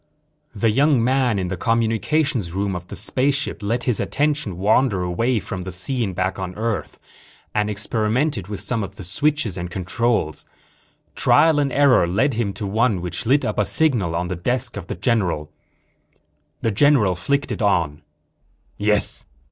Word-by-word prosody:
The 110 +2 +2
young 135 +1 +3
man 125 -3 +2
in 90 -2 -2
the 95 - -2
communications 115 - 0
room 100 0 -1
of 90 0 -7
the 100 - -8
spaceship 135 +8 0
let 115 +4 -1
his 125 -5 0
attention 140 - -1
wander 105 0 +2
away 115 +7 0
from 95 -2 -6
the 95 +1 -6
scene 100 +3 -1
back 95 +2 -2
on 90 -1 -5
Earth 110 -6 -3 0.5
and 105 0 0
experimented 110 - -1
with 105 -1 -5
some 115 -4 -1
of 95 - -7
the - - -9
switches 115 - 0
and 90 0 -4
controls. 95 -1 -1 0.7
Trial 160 -2 +4
and 140 -2 0
error 135 -9 +4
led 115 +11 +1
him 110 -3 -1
to 105 - -5
one 110 0 +1
which 90 +5 -5
lit 135 +1 +3
up 105 -2 -2
a - - +4
signal 115 - +2
on 90 +1 -1
the 90 - -3
desk 120 +8 -2
of 100 -4 -7
the - - -4
general. 90 -7 0 1.1
The 115 - +1
general 115 -4 +4
flicked 140 +11 -1
it - - -4
on. 85 -8 +1 0.8
"Yes?" 105 0 +1
105 Hz, 165 wpm, -21 LUFS, 95-125 Hz, 1.1 s, Trial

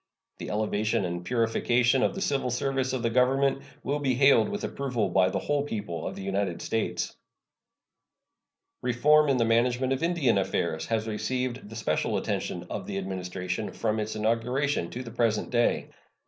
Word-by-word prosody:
The - - -5
elevation 105 -1 0
and 85 0 -3
purification 120 +3 +2
of - - +1
the 195 - -4
civil 135 -3 0
service 135 +1 0
of 130 -2 -2
the 115 - +1
Government 135 +3 +3 0.2
will 145 +3 -1
be 135 -3 +1
hailed 140 +9 +5
with 205 0 -4
approval 125 -7 -1
by 90 +1 +3
the - - -2
whole 145 -1 0
people 100 - -4
of - - -5
the 95 - -7
United 95 -2 -1
States. 115 -1 -2 1.7
Reform 145 +5 +4
in 135 - +3
the 115 - +3
management 125 +3 +2
of 135 - -3
Indian 160 - +2
affairs 85 -4 -1
has 110 -1 -1
received 125 +1 -2
the 110 - -9
special 95 -9 0
attention 90 0 -3
of 95 0 -5
the 100 - -3
Administration 95 +1 -4
from 110 -1 -1
its 110 +1 -3
inauguration 115 0 0
to 125 - -6
the 115 - -8
present 115 -2 0
day. 120 -1 +1
115 Hz, 170 wpm, -27 LUFS, 105-130 Hz, 1.7 s, hailed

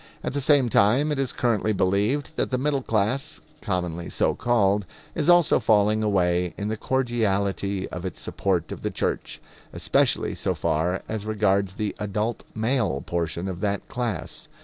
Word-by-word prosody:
At - - -3
the 140 - -1
same 140 -2 +4
time 120 +8 +3
it 145 - -1
is 135 -2 0
currently 110 -3 0
believed 105 +11 0
that - - -1
the 130 - 0
middle 140 +1 0
class, 115 +3 -1 0.2
commonly 90 -3 -2
so - - +1
called, 105 -5 +1 0.3
is - - 0
also 175 -2 +5
falling 105 0 +3
away 90 -4 +1
in 100 +1 -3
the 110 - -1
cordiality 100 -6 0
of 90 - -6
its 95 - -5
support 90 -4 -1
of - - -6
the - - -1
church, - - -3 0.3
especially - - +1
so - - -2
far 85 +3 0
as 110 -1 -4
regards 100 -3 +1
the 105 -1 -3
adult 105 +2 -2
male 110 - 0
portion 85 +1 -2
of 90 -2 -4
that 100 0 -2
class. 120 -5 -4
105 Hz, 165 wpm, -25 LUFS, 95-120 Hz, 0.3 s, also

